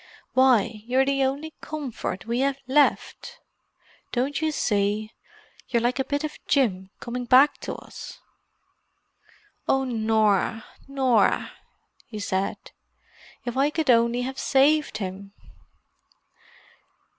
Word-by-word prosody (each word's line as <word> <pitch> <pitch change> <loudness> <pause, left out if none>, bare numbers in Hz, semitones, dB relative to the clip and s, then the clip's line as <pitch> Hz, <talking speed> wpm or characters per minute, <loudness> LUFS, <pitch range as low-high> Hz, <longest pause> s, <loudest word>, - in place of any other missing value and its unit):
Why, 235 -4 +3
you're 260 +2 +3
the 275 0 +1
only 290 +4 -3
comfort 265 -11 -5
we 235 +2 -1
have 275 0 +1
left. 285 +2 +1 0.7
Don't 270 +5 -1
you 315 0 +1
see, 210 -4 0 0.6
you're 235 - +1
like 250 +2 0
a - - +2
bit 285 +2 -2
of 305 0 -5
Jim 190 -9 +1
coming 245 +1 -5
back 260 +4 +5
to - - -5
us?" - - -10 1.5
"Oh, 270 0 +2
Norah—Norah!" 225 +2 +1 0.6
he 220 - -8
said. 195 -1 -2 0.9
"If 240 0 -4
I 275 +2 +3
could 305 -3 +1
only 235 +1 +3
have 265 +1 -5
saved 290 +3 +2
him!" 195 0 -6
250 Hz, 110 wpm, -25 LUFS, 220-275 Hz, 1.5 s, back